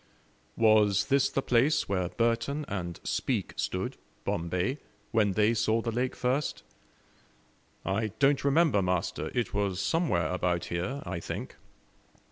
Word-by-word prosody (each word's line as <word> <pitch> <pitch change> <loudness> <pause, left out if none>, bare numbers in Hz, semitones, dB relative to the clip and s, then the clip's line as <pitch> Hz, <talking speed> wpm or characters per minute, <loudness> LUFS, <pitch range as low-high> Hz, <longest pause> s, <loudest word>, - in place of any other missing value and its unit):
"Was 105 -3 +4
this 140 -1 +3
the 135 - -1
place 135 +6 +3
where 90 -3 0
Burton 115 - 0
and 85 -4 -4
Speke - - -1
stood, - - -2 0.3
Bombay, 90 - -1 0.3
when 105 -4 +2
they 105 +4 +3
saw 115 0 +2
the 115 0 -2
lake 125 +3 -1
first?" 130 +4 -1 1.2
"I 105 +3 0
don't 140 -1 +3
remember, 140 -6 +3
master; 90 -2 -1
it 120 -2 -1
was 100 -2 0
somewhere 100 - +1
about 90 -1 0
here, 115 - -2
I - - -3
think." - - -6
110 Hz, 130 wpm, -29 LUFS, 90-130 Hz, 1.2 s, Was